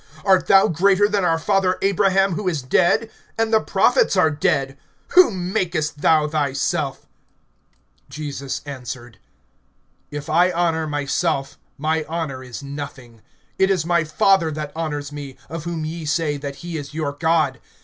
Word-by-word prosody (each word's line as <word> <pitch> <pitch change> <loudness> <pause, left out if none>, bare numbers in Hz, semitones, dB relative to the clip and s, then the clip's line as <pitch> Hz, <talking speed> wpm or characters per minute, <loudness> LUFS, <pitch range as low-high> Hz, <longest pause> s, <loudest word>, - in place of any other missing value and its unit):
(53)Art 190 -2 +4
thou 195 0 +6
greater 195 +5 +3
than 205 -2 0
our 165 -2 +2
father 185 +1 +1
Abraham, 195 0 +3
who 195 +3 -3
is 160 -7 -1
dead? 215 - +2 0.3
And 225 0 0
the 220 - +6
prophets - - +2
are 160 - +4
dead. 135 -2 0 0.3
Whom 190 - +4
makest 155 -7 -1
thou 155 -2 +4
thyself? 145 -3 -1 1.0
(54)Jesus 140 -3 -5
answered: 125 -5 -8 0.9
If 145 0 -6
I 175 +4 +4
honor 165 -2 0
myself, 145 -1 -1 0.2
my 155 +2 0
honor 155 -6 -4
is 125 +2 -8
nothing. 135 -5 -8 0.4
It 190 - +4
is 185 -5 +1
my 170 -1 +2
Father 165 +2 +3
that 150 -1 -5
honors 145 -3 -4
me, 145 -2 -8
of 165 0 -6
whom 165 -2 -3
ye 160 +1 -5
say, 155 -1 0
that 140 -1 -6
he 170 -2 -4
is 145 0 -8
your 155 -3 -1
God. 155 -3 +1
160 Hz, 150 wpm, -21 LUFS, 145-180 Hz, 1.0 s, thou